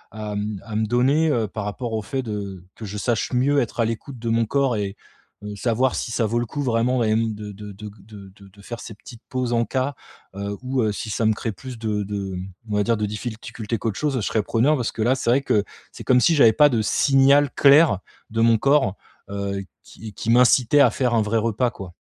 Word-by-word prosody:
à, 105 -1 -5
mmh 105 -1 -4
à, 110 - -7
me 110 0 +1
donner 125 0 +2
par 105 -2 -3
rapport 115 +3 -4
au 110 - -1
fait 135 +4 -3
de 100 -4 -6
que 110 - -8
je 105 +1 -6
sache 120 +1 -1
mieux 140 +4 +2
être 120 0 -5
à - - +3
l'écoute 115 +3 -5
de 115 0 -3
mon 115 0 +2
corps 135 0 +1
et 100 0 -3 0.5
et 105 0 -6
savoir 125 +4 +1
si 115 - -3
ça 115 - 0
vaut 120 +3 -1
le 120 - -1
coup 145 +6 -5
vraiment 120 0 +1
et - - +1
hem, 110 0 +1
de 105 0 -7
de 105 +1 -9
de 105 +2 -11
g - - -9 0.2
de 100 -3 -12 0.2
de 100 +1 -19
faire 120 +2 -7
ces 110 - -8
petites 115 +2 -14
pauses 125 -2 -2
encas, 130 +3 0 0.4
heu, 100 +1 -4
ou 125 -4 0
si 110 - -5
ça 115 - -1
me 110 - +4
crée 115 +1 -4
plus 125 +3 -9
de 105 -2 -1
de 100 -2 -4
mmh, 90 +1 -6 0.2
on - - 0
va 105 - +2
dire 115 +1 +1
de 105 - -1
difficultés 110 +1 -5
qu'autre 110 -4 -3
chose 150 -3 0
je - - -1
serais 105 +1 0
preneur, 125 +9 +2
parce 120 - -2
que 110 - -4
là 125 +4 +3
c'est 120 - -2
vrai 135 +2 +3
que, 105 -6 +1 0.3
c'est - - -10
comme 125 -1 +5
si 165 - +4
j'avais 115 -6 +6
pas 145 +5 +6
de 115 -4 +1
signal 140 +4 +4
clair 140 - +6 0.3
de 115 0 0
mon 115 -1 +5
corps, 135 -8 +2 0.3
heu, 100 -1 -3 0.2
qui 110 -2 -11
qui 115 - -5
m'incitait 125 +3 +5
à 125 - +5
faire 125 0 0
un 110 - +3
vrai 110 +2 0
repas 115 +2 0
quoi. 90 -3 -10
115 Hz, 240 wpm, -22 LUFS, 105-125 Hz, 0.5 s, j'avais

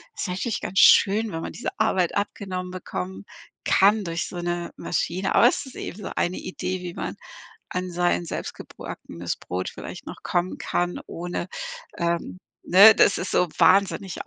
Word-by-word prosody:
ist - - -3
eigentlich 190 +5 -2
ganz 190 - -1
schön, 210 +2 +6
wenn 165 - -4
man - - -6
diese - - -3
Arbeit 190 -5 +2
abgenommen 190 -2 -3
bekommen 95 - -5 0.4
kann 205 +2 +4
durch 170 -1 -3
so 180 - -8
'ne 175 0 -3
Maschine. 185 +2 -1
Aber - - +7
es 260 - 0
ist 265 - -12
eben - - -6
so - - -4
eine 175 +1 0
Idee, 185 0 -4
wie 175 -1 -6
man - - -4 0.6
an 180 0 -3
sein 175 0 +1
selbstgebackenes 85 - -6
Brot 90 +1 -4
vielleicht - - -9
noch - - -9
kommen 175 +1 -1
kann, 175 0 -1
ohne, 175 +1 -4 0.5
ähm, 170 - -1 0.2
ne, 205 +5 +8
dass 200 - +4
es 185 - -3
so 180 - +3
wahnsinnig 195 0 +3
180 Hz, 165 wpm, -24 LUFS, 175-195 Hz, 0.6 s, ne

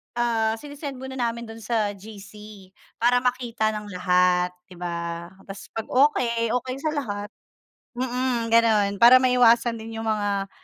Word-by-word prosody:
ah, 225 -2 +1
sine-send 285 +2 -8
muna 265 0 -8
namin 235 0 -2
dun 225 0 -10
sa 215 -2 -1
GC 205 -1 -12 0.3
para 245 +1 +3
makita 245 -3 -1
ng 210 -1 -7
lahat 180 -1 +2 0.2
'di 180 -2 -14
ba. 170 -1 -4 0.2
'Tas 195 0 -10
pag 225 - -2
okey 235 -4 +2
okey 255 +1 -3
sa 310 +1 -1
lahat 205 -7 -4 0.7
mm, 250 -2 -2
gano'n, 220 -3 +4
para 245 +2 +8
maiwasan 240 -2 +4
din 225 +1 -8
'yung - - -4
mga, 205 -2 -1
225 Hz, 145 wpm, -24 LUFS, 205-245 Hz, 0.7 s, para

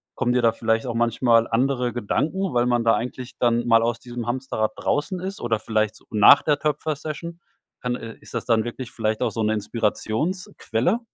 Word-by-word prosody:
kommen 125 -2 0
dir 125 - +2
da 115 -1 +4
vielleicht 115 +1 0
auch 120 - -3
manchmal 115 0 +3
andere 125 +1 0
Gedanken, 160 - -1
weil 120 0 +2
man 120 -1 +1
da 115 0 +4
eigentlich 125 +1 -5
dann 120 0 +1
mal 115 -1 +5
aus 115 0 -1
diesem 120 -1 -6
Hamsterrad 120 -3 -1
draußen 180 +6 -1
ist 190 +2 -5
oder 115 -2 0
vielleicht, 110 -1 0
so, - - -19
nach 110 +5 +7
der 150 -2 +2
Töpfer-Session? 155 +2 -3 0.4
Dann, 125 0 -1
äh, 115 -2 -8
ist - - -14
das - - -3
dann 115 -2 +2
wirklich 120 +1 -6
vielleicht 110 -1 -2
auch - - +1
so 115 - -3
'ne 110 +1 +2
Inspirationsquelle? 115 - -1
120 Hz, 195 wpm, -23 LUFS, 115-135 Hz, 0.4 s, nach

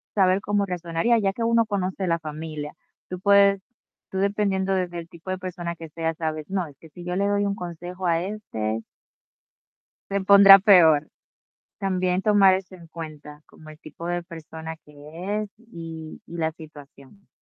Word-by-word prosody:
saber 190 -1 +3
cómo 205 -1 0
reaccionaría, 180 +5 0
ya 195 -2 +1
que 230 - -4
uno 230 0 +3
conoce 190 -2 -2
la 165 0 +2
familia. 155 -1 -6 0.4
Tú 185 -1 -5
puedes 200 0 +5 0.5
tú 190 - -5
dependiendo 195 -1 0
desde 180 -2 -2
el 165 - -10
tipo 170 +1 -12
de 185 - -1
persona 175 -2 -5
que 165 -1 -10
sea, 165 +1 -2
¿sabes? 155 -1 -4
No, 190 -3 -1
es 145 -3 -14
que 160 - -15
si 175 +3 -12
yo 180 0 -3
le 200 +1 +1
doy 205 0 +1
un 200 0 -1
consejo 180 +1 -7
a 165 0 +1
este 115 - -4 1.3
se 200 0 0
pondrá 195 0 +9
peor, 170 -7 +6 0.7
también 185 -1 0
tomar 200 -2 +5
eso 190 0 -7
en 170 -2 -14
cuenta, 155 -2 -9
como 155 0 -16
el 155 - -12
tipo 155 +2 -9
de 175 0 -2
persona 160 -1 -9
que 150 - -18 0.5
es 210 - -6
y 165 -8 -9
y 170 - -9
la 160 -1 0
situación. 155 +3 -15
180 Hz, 175 wpm, -24 LUFS, 160-195 Hz, 1.3 s, pondrá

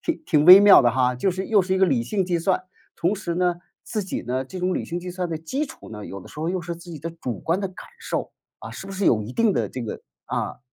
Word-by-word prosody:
挺 330 -1 -2
挺 150 - +2
微 185 +3 +11
妙 205 -1 +8
的 120 -2 +3
哈。 125 0 +1
就 190 +10 +1
是 185 +2 -4
又 215 -2 +4
是 185 0 0
一 190 - +1
个 190 - +5
理 135 -9 +1
性 195 - -1
计 175 -1 0
算， 185 +2 0 0.3
同 175 +5 0
时 175 -4 -4
呢， 180 -1 +1 0.3
自 215 -3 -3
己 190 - -4
呢， 130 +2 -2
这 185 +7 -8
种 180 +1 0
理 - - -2
性 175 +1 -4
计 180 +1 -6
算 180 -1 -3
的 165 - -3
基 265 - -3
础 - - -13
呢， 105 -1 -8
有 100 - -8
的 - - -13
时 - - -13
候 160 +2 -2
又 185 0 -1
是 170 0 -5
自 170 +1 -12
己 155 - -7
的 165 - -4
主 130 - -6
观 170 +4 0
的 200 - -1
感 185 - -12
受。 - - -3 0.3
啊， - - -8
是 195 - -8
不 195 - -7
是 195 +1 -2
有 110 -2 +3
一 110 +4 -8
定 225 - +2
的 - - -1
这 130 - -6
个 110 - -6 0.2
啊。 - - -3
175 Hz, 320 characters per minute, -23 LUFS, 145-190 Hz, 0.3 s, 微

